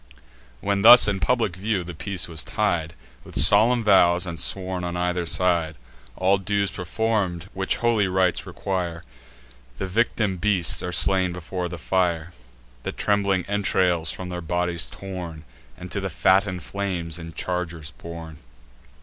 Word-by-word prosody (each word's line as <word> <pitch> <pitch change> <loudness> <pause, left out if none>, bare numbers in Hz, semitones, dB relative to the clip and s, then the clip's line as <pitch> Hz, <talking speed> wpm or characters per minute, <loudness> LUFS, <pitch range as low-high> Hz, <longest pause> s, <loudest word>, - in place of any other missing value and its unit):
When 100 0 0
thus 120 +2 +9
in 100 -2 0
public 115 -5 0
view 100 0 -1
the 90 +1 -8
peace 95 +2 -3
was 80 -3 -2
tied 85 -8 -1 0.3
With - - -11
solemn 110 - +5
vows, 90 -3 +4
and 85 -2 -6
sworn 95 -1 -1
on 90 0 -3
either 90 -1 -1
side, 85 -2 +1 0.4
All 95 +1 +2
dues 100 +1 -1
perform'd 95 -2 -2
which 95 0 -1
holy 115 -4 +2
rites 95 -1 +1
require; 90 -3 -4 0.7
The 95 - -3
victim 105 0 0
beasts 95 -3 +2
are 90 - -4
slain 90 +2 +4
before 90 +1 -5
the 90 - -6
fire, 85 -1 -1 0.5
The - - -4
trembling 100 -3 0
entrails 90 -5 +1
from 90 -1 -7
their 90 -1 -5
bodies 85 0 -2
torn, 90 -5 -8 0.3
And - - -9
to - - -2
the - - -3
fatten'd 95 -1 +2
flames 90 -5 -4
in 80 -1 -9
chargers 85 -4 -4
borne. 80 -1 -10
90 Hz, 150 wpm, -24 LUFS, 85-100 Hz, 0.7 s, thus